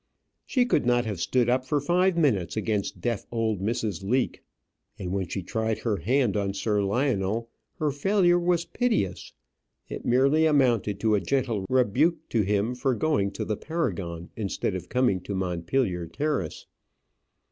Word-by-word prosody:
She 250 -2 +2
could 200 - +2
not 120 0 +2
have 105 -6 -4
stood 125 +3 +2
up 130 +1 +2
for 145 +3 0
five 175 +5 +2
minutes 110 - +1
against 105 -4 -2
deaf 115 0 -2
old 110 -4 -1
Mrs. 105 -3 -2
Leake; 125 +6 0 0.6
and 90 -2 -5
when 95 -1 -1
she 95 +2 -4
tried 110 +3 -1
her 110 -4 -1
hand 120 - +1
on 100 -1 -1
Sir 105 +1 0
Lionel, 115 0 0 0.3
her 150 -2 0
failure 175 +4 +3
was 175 -1 +1
piteous. 230 - -1 0.6
It - - -6
merely 140 +6 +3
amounted 120 -9 +2
to 110 -1 +2
a 105 - +4
gentle 120 -8 -1
rebuke 130 - +2
to 115 - +2
him 105 +4 0
for 125 +1 0
going 140 -7 +1
to - - -4
the 105 - -2
Paragon 95 - -3
instead 105 -1 -2
of 95 - -6
coming 125 -8 +2
to 100 +2 -5
Montpellier 90 +1 -1
Terrace. 145 - -2
115 Hz, 160 wpm, -26 LUFS, 100-140 Hz, 0.6 s, a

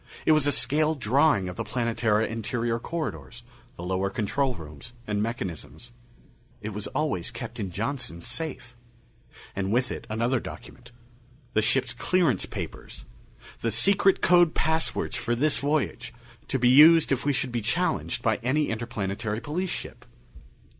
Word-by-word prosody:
It - - +5
was 155 -2 +4
a - - +3
scale 155 +3 +2
drawing 130 -4 +2
of 90 - -6
the - - -2
Planetara 115 -3 0
interior 115 +1 -2
corridors, 150 -5 -5 0.3
the 85 - -8
lower 95 +2 -1
control 125 +6 -1
rooms 75 - -10
and 105 -1 -1
mechanisms. 115 - -5 0.7
It 105 -1 -5
was 105 0 -5
always 140 - -1
kept - - -7
in 100 - -3
Johnson's 100 -3 -4
safe. 135 -6 -5 0.8
And 95 0 -2
with 125 +2 +1
it, - - -6
another 120 +4 +1
document: 120 +1 -11 0.6
the 110 - +3
ship's 125 +2 +2
clearance 130 - +1
papers - - -7 0.6
the 115 - 0
secret 195 - +3
code 175 -2 +5
passwords 160 +2 0
for 120 0 -1
this 145 +4 +1
voyage, 140 -5 -1 0.3
to 135 - 0
be 125 -1 +3
used 155 +5 +7
if 135 -1 +1
we 145 - +2
should 130 -1 -1
be 120 -1 -1
challenged 165 - -1
by 110 -2 +2
any 135 +5 0
Interplanetary 110 -2 -3
Police 175 +7 -2
ship. - - -5
120 Hz, 150 wpm, -26 LUFS, 110-145 Hz, 0.8 s, used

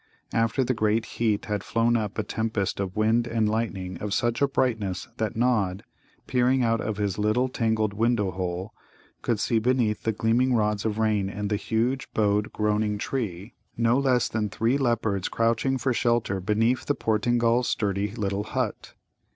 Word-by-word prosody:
After 115 +4 +2
the 130 - 0
great 110 0 +1
heat 110 -3 -1
had 105 -3 -2
flown 115 +1 +1
up 105 -3 -2
a 110 - 0
tempest 110 -2 -2
of 95 -2 -3
wind 110 +2 +2
and 115 -2 +1
lightning 100 -5 -2
of 105 -1 -2
such 120 +1 0
a 140 - +5
brightness 110 -9 -1
that 110 -1 -2
Nod, 105 -5 +1 0.4
peering 125 +1 +2
out 115 -1 +1
of 105 -1 -3
his 105 -1 -1
little 110 +5 +2
tangled 110 -4 0
window 110 -2 +1
hole, 90 +3 -4 0.5
could 115 -3 0
see 115 +1 +1
beneath 120 -2 +1
the 110 - 0
gleaming 120 +4 +2
rods 105 -1 0
of 110 -1 -1
rain 105 -3 +1
and 105 +1 -4
the - - +3
huge, 115 +5 -1
bowed, 105 0 +1
groaning 105 0 0
trees 105 -4 -4 0.3
no 115 +2 +3
less 130 -3 +2
than 110 -1 -2
three 115 +6 +1
leopards 110 -7 0
crouching 115 +4 +1
for 130 0 0
shelter 115 -5 +1
beneath 115 +6 +1
the 145 - +2
Portingal's 120 +2 +1
sturdy 100 -1 0
little 100 -2 -2
hut. - - -3
110 Hz, 170 wpm, -26 LUFS, 105-120 Hz, 0.5 s, a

